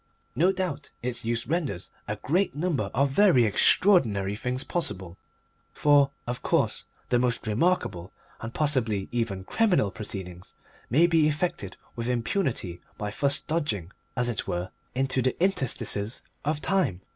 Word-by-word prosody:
No 180 +4 +4
doubt 180 -7 -3
its 120 -2 -2
use 115 +1 0
renders 145 - -2 0.2
a 105 - -2
great 160 - 0
number 150 - -1
of 140 +3 +1
very 150 - +5
extraordinary 105 - +4
things 125 +3 -2
possible; 95 - -2 0.6
for, 145 -2 +4 0.2
of 120 +1 -4
course, - - 0 0.2
the 120 - +3
most 120 -1 0
remarkable 105 - 0 0.3
and, 115 - -6
possibly, 120 -10 0
even 115 -6 -2
criminal 180 - +2
proceedings 95 -4 -8 0.3
may 155 +9 +5
be 165 -3 +4
effected 150 - -2 0.2
with 115 0 -4
impunity 120 - -1 0.2
by 105 0 -3
thus 140 +6 +1
dodging, 110 - -2 0.3
as 125 0 +2
it 120 -4 -2
were, 90 +1 -3 0.2
into 130 0 +1
the 130 +1 -1
interstices 130 - 0 0.2
of 150 +1 -1
time. 185 - +1
125 Hz, 140 wpm, -27 LUFS, 105-155 Hz, 0.6 s, very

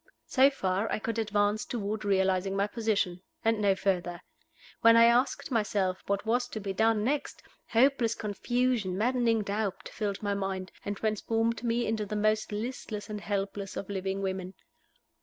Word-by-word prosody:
So 265 +1 +5
far 195 -5 -1
I - - +1
could 225 +1 -3
advance 210 0 +1
toward 215 -2 -3
realizing 190 -1 +1
my 200 0 +2
position 205 -5 -1 0.2
and 225 -1 +2
no 200 -2 +4
further. 180 -3 -1 0.6
When 230 0 +7
I 230 - +8
asked 240 +4 +2
myself 200 -5 0
what 200 +1 -1
was 245 +2 +1
to 225 - -6
be 200 -2 -4
done 220 +1 +2
next, 280 +5 -2 0.2
hopeless 235 -1 +3
confusion, 220 -2 -1
maddening 230 -1 +2
doubt, 200 -1 -3
filled 205 -2 -3
my 205 -1 0
mind, 195 -2 -3
and 205 0 -3
transformed 225 +2 0
me 235 0 +1
into 215 -2 -1
the 210 - -4
most 215 +1 +1
listless 215 -1 -5
and 210 -1 -4
helpless 200 -1 -3
of 200 - -5
living 195 0 -2
women. 190 -1 -3
210 Hz, 160 wpm, -29 LUFS, 195-230 Hz, 0.6 s, I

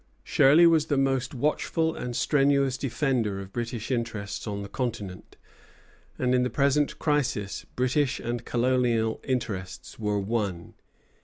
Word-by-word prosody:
Shirley 150 +6 +5
was 160 -2 +4
the 145 - +1
most 135 -1 0
watchful 160 +4 0
and 125 -1 -5
strenuous 140 -2 +2
defender 125 -6 -1
of 95 0 -9
British 120 0 -4
interests 110 -4 -3
on 100 -1 -3
the - - -6
continent; 105 -6 -5 0.8
and 125 0 +1
in 125 - +3
the 125 - +1
present 140 +3 +1
crisis 135 -10 -1
British 130 +2 +1
and 120 0 -3
colonial 120 -3 +1
interests 105 -9 -4
were 105 -1 0
one. 100 -4 -3
125 Hz, 135 wpm, -27 LUFS, 110-135 Hz, 0.8 s, Shirley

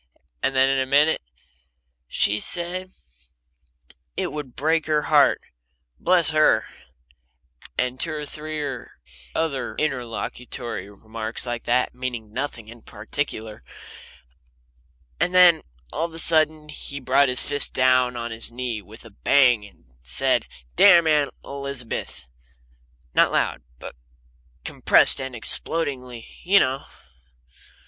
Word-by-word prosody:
And 135 - -1
then, 130 0 +4
in 135 0 +1
a 130 - -1
minute: 145 +4 +3 0.9
"She 105 +10 +1
said 180 - -2 1.3
it - - -2
would 145 -5 -7
break 160 +2 0
her 150 -1 +1
heart - - +3 0.6
bless 175 -4 +2
her!" 155 0 +3 1.1
And 125 0 -1
two 165 - -2
or 150 -1 -5
three 155 +1 -6 0.7
other 140 -7 -2
interlocutory 120 -5 -4
remarks 110 +3 -3
like 120 -1 -5
that, 125 +1 +1
meaning 120 -4 -6
nothing 125 -4 -5
in 115 +1 -13
particular. 110 - -6 1.6
And 180 - 0
then 180 -3 +7 0.3
all 165 - -1
of 170 - -8
a - - -7
sudden 155 -2 +3
he 140 -1 -7
brought 135 +1 +2
his 125 - +2
fist 145 0 +1
down 130 -1 +2
on 120 0 -5
his 115 +1 -2
knee 120 -3 -4
with 110 +4 -15
a 115 - -13
bang 120 +1 +3
and 100 -11 -17 0.2
said, - - +1 0.3
"Damn 175 -4 +7
Aunt 150 -2 +2 0.2
Elizabeth!" 140 -4 -6 0.9
not - - +4
loud, 65 - -1 0.2
but - - -10 0.7
compressed - - +5
and 130 -1 -6
explodingly, 125 -2 -1
you 195 +3 +4
know. 135 +2 -1
130 Hz, 125 wpm, -23 LUFS, 120-155 Hz, 1.6 s, then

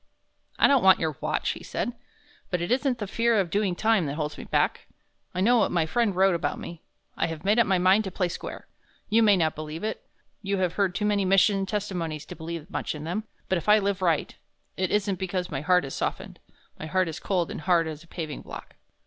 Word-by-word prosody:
"I - - +5
don't 275 -3 +4
want 190 -1 +7
your 160 -3 -1
watch," - - 0
he - - -8
said, - - -3 0.6
"but 180 - -1
it 175 +4 -3
isn't 260 0 +1
the 210 - -4
fear 230 +2 +2
of 180 -4 -1
doing 200 -3 +1
time 220 -5 +2
that 140 - -3
holds 150 -1 -3
me - - -9
back. - - 0 0.5
I 185 - 0
know 240 +4 +5
what - - +3
my 170 -3 +1
friend 225 +2 +1
wrote 190 0 +4
about 170 - -1
me. 170 -2 -8 0.3
I 165 - 0
have 160 0 -7
made 210 +4 +4
up 235 - +4
my 190 -1 +3
mind 190 +4 +4
to 190 - -4
play 180 0 0
square. 175 - -7 0.4
You 225 +2 +4
may 205 -3 +5
not 160 -3 +1
believe 155 +3 -7
it. 220 - -3 0.4
You 200 -1 -1
have 180 -2 0
heard 195 -3 0
too 210 - -1
many 205 -1 +2
mission 195 +1 +3
testimonies 175 -7 -3
to - - -9
believe 165 0 -6
much - - -3
in 150 - -7
them. 185 +7 -3 0.2
But 185 - +1
if 170 - -5
I 210 - +8
live 200 -2 -1
right 170 -4 +1 0.4
it 185 -1 -1
isn't 200 -3 0
because 185 -1 -3
my 135 -2 -2
heart 180 0 +3
is 135 - -7
softened, - - -4 0.4
my 155 - -5
heart 185 +2 +1
is 165 0 -5
cold 180 -4 -1
and - - -6
hard 170 +1 +3
as 155 0 -6
a - - -20
paving 160 -3 -6
block." - - -10
185 Hz, 235 wpm, -26 LUFS, 165-205 Hz, 0.6 s, I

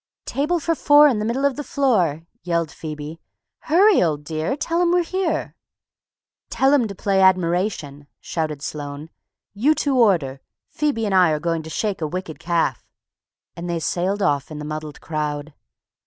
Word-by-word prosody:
"Table 300 +5 0
for 330 +2 0
four 295 -1 +6
in 245 -7 +1
the 210 - -2
middle 250 +5 0
of 280 -1 +1
the 295 - -3
floor," 210 - +1 0.2
yelled 170 -3 -1
Phoebe. 155 0 -7 0.5
"Hurry, 385 +6 +5
old 150 -4 0
dear, 160 - -2
tell 335 +3 0
'em 345 -1 +3
we're 355 0 +3
here!" 370 +1 -2 0.9
"Tell 270 +1 +2
'em 255 -6 +3
to 200 - -8
play 195 0 +1
'Admiration'!" 175 -5 +1
shouted 155 -3 -4
Sloane. 145 +1 -6 0.4
"You 265 +10 +2
two 285 -3 0
order; 155 - +2 0.3
Phoebe 285 -7 -1
and 200 - -1
I 185 -3 +5
are 155 -1 0
going 165 0 -1
to 160 - -10
shake 200 +1 -2
a 155 - 0
wicked 160 -2 -6
calf," 165 -7 0 0.7
and 175 +1 -6
they 170 - -1
sailed 180 +5 -1
off 145 -6 +1
in 155 - -7
the 150 - -6
muddled 155 -1 -6
crowd. 150 -1 -4
175 Hz, 170 wpm, -22 LUFS, -, 0.9 s, four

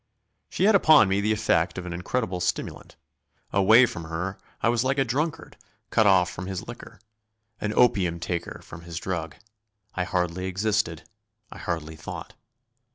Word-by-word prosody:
She - - -2
had 215 +2 +6
upon 155 - +6
me 95 +1 +1
the 105 +1 +1
effect 100 -6 +1
of 90 - -5
an 90 - -5
incredible 90 +1 -2
stimulant; 90 - -3 0.6
away 110 +6 +6
from 85 -8 -6
her 85 +4 -4 0.2
I - - +4
was 120 0 +2
like 135 +2 0
a 135 - +2
drunkard 145 +7 -3 0.3
cut 110 - +4
off 95 -3 +5
from 90 +1 -7
his 95 -2 -5
liquor; 115 -2 -10 0.6
an 105 - -2
opium 90 -8 +3
taker 85 0 -4
from 80 - -11
his 85 -1 -8
drug. 85 -3 -4 0.6
I 90 - -1
hardly 90 0 -1
existed; 95 -3 -1 0.5
I - - -10
hardly 80 -2 -4
thought. - - -8
95 Hz, 160 wpm, -26 LUFS, 85-110 Hz, 0.6 s, had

